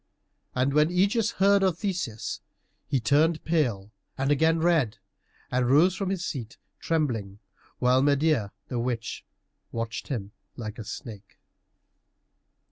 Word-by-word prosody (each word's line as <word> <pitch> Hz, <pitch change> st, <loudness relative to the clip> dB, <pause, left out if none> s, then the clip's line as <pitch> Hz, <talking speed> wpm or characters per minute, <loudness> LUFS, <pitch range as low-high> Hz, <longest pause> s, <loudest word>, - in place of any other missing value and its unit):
And 130 Hz, +2 st, +1 dB
when 150 Hz, +2 st, +4 dB
Ægeus 200 Hz, +5 st, +2 dB
heard 200 Hz, +1 st, +4 dB
of 185 Hz, -4 st, +2 dB
Theseus 175 Hz, -, -3 dB, 0.5 s
he 140 Hz, -3 st, +1 dB
turned 155 Hz, +7 st, +2 dB
pale 120 Hz, -, 0 dB, 0.3 s
and 135 Hz, +2 st, +1 dB
again 160 Hz, +3 st, +3 dB
red, 160 Hz, -9 st, +2 dB, 0.5 s
and 125 Hz, -1 st, +1 dB
rose 160 Hz, +7 st, +5 dB
from 195 Hz, -1 st, -2 dB
his 190 Hz, -2 st, -2 dB
seat 120 Hz, -6 st, -5 dB, 0.2 s
trembling, 120 Hz, -12 st, -1 dB, 0.4 s
while 125 Hz, +1 st, +3 dB
Medeia, 140 Hz, -6 st, +2 dB, 0.2 s
the 125 Hz, -, -2 dB
witch, 120 Hz, -1 st, -3 dB, 0.5 s
watched 115 Hz, 0 st, -4 dB
him 105 Hz, -7 st, -4 dB, 0.3 s
like 110 Hz, -1 st, -6 dB
a -, -, -4 dB
snake. 105 Hz, -1 st, -9 dB
140 Hz, 125 wpm, -27 LUFS, 115-165 Hz, 0.5 s, rose